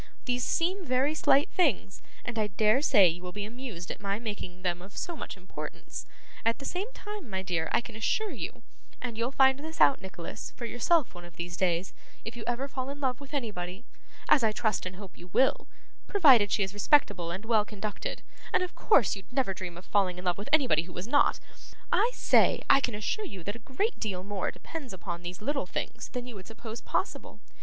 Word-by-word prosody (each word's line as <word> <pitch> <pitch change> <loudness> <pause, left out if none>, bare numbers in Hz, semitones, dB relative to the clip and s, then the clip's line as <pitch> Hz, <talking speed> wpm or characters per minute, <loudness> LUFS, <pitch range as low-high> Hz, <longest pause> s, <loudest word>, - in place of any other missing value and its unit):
These 250 -1 0
seem 365 +7 +1
very 270 0 +2
slight 290 -2 +4
things, 270 - +1 0.2
and 235 -2 -2
I 215 - +2
dare 215 +5 +3
say 210 -10 +7
you 170 +1 -2
will 180 0 -6
be 205 +2 -4
amused 220 -6 -6
at - - -7
my 200 0 -1
making 205 -5 -6
them 175 -1 0
of 190 +2 -12
so 345 - -3
much 300 - -7
importance; 185 0 -8 0.4
at 230 0 +2
the 275 - -9
same 390 - -3
time, 415 - -8
my 190 -1 -2
dear, 165 -3 -1
I - - +3
can 230 -2 -10
assure 410 - 0
you - - -6 0.4
(and 245 -2 -4
you'll 230 +3 -1
find 265 0 +5
this 320 +2 -7
out, 275 - +6
Nicholas, 185 -3 -7
for 240 - -5
yourself 260 +6 +2
one 175 -1 -10
of 175 -2 -12
these 175 +1 -5
days, 180 0 0 0.3
if 230 - -5
you 235 - -7
ever 245 +3 -1
fall 260 -1 -4
in 285 +1 -6
love 260 -2 -1
with 280 - -10
anybody; 210 -6 -4 0.4
as 275 - +6
I 220 - +4
trust 215 -3 0
and 185 - -7
hope 195 -1 -10
you 175 - -11
will, 265 - +3 0.4
provided 265 - +6
she 205 - +3
is 190 0 -4
respectable 205 - +3
and 190 +5 -5
well 220 -2 +4
conducted, 210 0 -5 0.3
and - - +3
of 360 - -4
course 285 - +4
you'd 195 +4 -12
never 255 -7 +1
dream 180 -2 -6
of 180 - -11
falling 185 -3 +2
in 180 - -7
love 180 +1 +1
with 200 - -6
anybody 260 - +5
who 175 +2 -11
was 180 - -4
not), 285 +4 +4 0.5
I 475 - +4
say, - - +4
I 275 - +6
can 240 -4 0
assure 310 - -2
you 195 - -8
that 205 +5 -3
a - - -8
great 275 - -2
deal 190 -5 -2
more 200 -1 -2
depends 285 -9 -7
upon 175 -2 -5
these 180 +3 -7
little 275 -5 -1
things 230 +6 -4
than 245 -1 -4
you 250 - -8
would 190 -3 -10
suppose 225 0 -7
possible. - - -2
220 Hz, 220 wpm, -29 LUFS, 190-270 Hz, 0.5 s, say